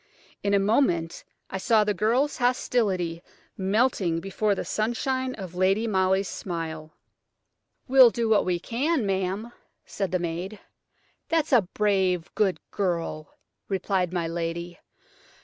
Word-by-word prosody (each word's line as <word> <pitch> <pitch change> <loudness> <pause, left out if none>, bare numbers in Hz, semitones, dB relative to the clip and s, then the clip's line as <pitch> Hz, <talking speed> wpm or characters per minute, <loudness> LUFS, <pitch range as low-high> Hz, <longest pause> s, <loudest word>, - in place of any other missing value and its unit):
In 200 0 +1
a - - +4
moment 195 -6 +1 0.3
I 190 - -3
saw 220 +1 +3
the 210 0 0
girls' 240 +9 +1
hostility 205 -9 0 0.3
melting 195 -4 +1
before 195 +3 0
the - - -4
sunshine 255 +4 -1
of 185 -4 -8
Lady 190 +5 +2
Molly's 190 -2 +1
smile. 160 -3 -6 0.9
"We'll 260 -2 +8
do 230 0 -1
what 220 -1 +4
we 180 -1 0
can, 260 - 0
ma'am," 195 +4 -2 0.3
said 195 -2 -3
the 185 - +2
maid. 175 +4 -4 0.7
"That's 320 -3 +1
a 245 - +7
brave, 190 -5 +1
good 195 -4 +1
girl!" 170 -5 -3 0.3
replied 190 -2 0
my 175 -2 -1
lady. 170 +1 -4
195 Hz, 130 wpm, -26 LUFS, 175-225 Hz, 0.9 s, We'll